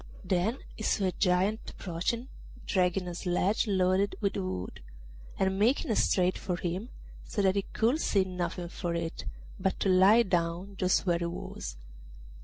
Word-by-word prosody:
Then 190 +6 +1 0.2
he - - -10
saw 210 -1 +1
a 185 - +2
Giant 185 +5 +1
approaching, 195 +8 -3 0.4
dragging 180 -1 +1
a 175 - -4
sledge 180 +5 0
loaded 190 0 +2
with 200 -2 0
wood, 95 0 -4 0.6
and 190 0 +1
making 230 +1 +2
straight 185 -3 +2
for 180 - -2
him, 180 +7 -3 0.3
so 205 - -2
that 190 -1 +4
he 200 - +2
could 245 +8 +2
see 195 -2 +3
nothing 180 -1 -4
for 170 -1 -3
it 165 -1 -4 0.3
but 190 - 0
to 195 - +2
lie 195 +5 +6
down 175 +1 -1
just 185 +1 +2
where 170 -2 +2
he 170 - -2
was. 115 - -6
185 Hz, 160 wpm, -30 LUFS, 175-200 Hz, 0.6 s, lie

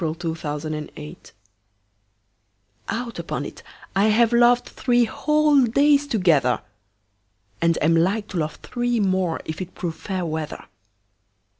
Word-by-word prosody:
The 165 0 -2
Constant 150 -1 -5
Lover 75 - -8 1.7
OUT 235 +1 -4
upon - - -4
it, - - -9 0.3
I 195 +2 +4
have 225 +2 +4
lovedThree 240 0 +3
whole 300 +4 +3
days 285 +4 +3
together! 160 - +2 1.0
And 165 -1 +2
am 165 +2 +4
like 195 +6 +1
to 190 - -4
love 155 -1 -2
three 240 -1 -1
more, 185 -4 0
If 160 +3 -5
it 185 0 -7
prove 170 -3 -3
fair 185 -3 -3
weather. 155 -1 -4
190 Hz, 125 wpm, -23 LUFS, 160-240 Hz, 1.7 s, I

